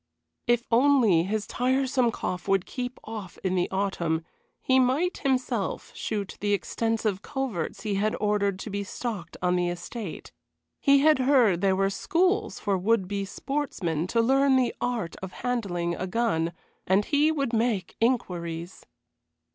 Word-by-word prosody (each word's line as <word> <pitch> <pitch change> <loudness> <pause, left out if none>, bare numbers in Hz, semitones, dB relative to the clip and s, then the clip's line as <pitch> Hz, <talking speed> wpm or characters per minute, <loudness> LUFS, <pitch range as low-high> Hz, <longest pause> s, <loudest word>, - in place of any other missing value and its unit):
If 240 0 +3
only 235 -8 +5
his 210 +2 -1
tiresome 255 0 +1
cough 185 -5 -4
would 195 -2 +2
keep 250 0 -5
off 215 -5 -7
in 185 -1 0
the 180 -1 +1
autumn, 170 -5 -1 0.3
he 260 0 +3
might 270 +8 +1
himself 255 -6 -1
shoot 205 -3 -4
the 205 0 +1
extensive 215 -1 -1
coverts 260 - -3
he 210 -2 -1
had 210 +2 +1
ordered 205 -2 +1
to 215 - -6
be 200 +1 -2
stocked 200 -4 -5
on 180 0 +3
the 175 -1 +1
estate. 175 +3 -6 0.5
He 280 0 +5
had 310 -1 +5
heard 250 -9 +4
there 195 -1 +3
were 195 +1 +1
schools 370 - +1
for 195 -2 0
would 200 0 +2
be 200 0 -2
sportsmen 190 - -2
to 230 +4 +2
learn 270 +3 +4
the 255 -2 +2
art 235 -9 -2
of 190 -1 -7
handling 185 -9 -1
a 185 +2 -3
gun, 180 -6 0 0.3
and 195 +3 +3
he 295 +2 +3
would 275 -6 -1
make 220 -5 0
inquiries. 175 -8 -2
215 Hz, 155 wpm, -27 LUFS, 185-255 Hz, 0.5 s, only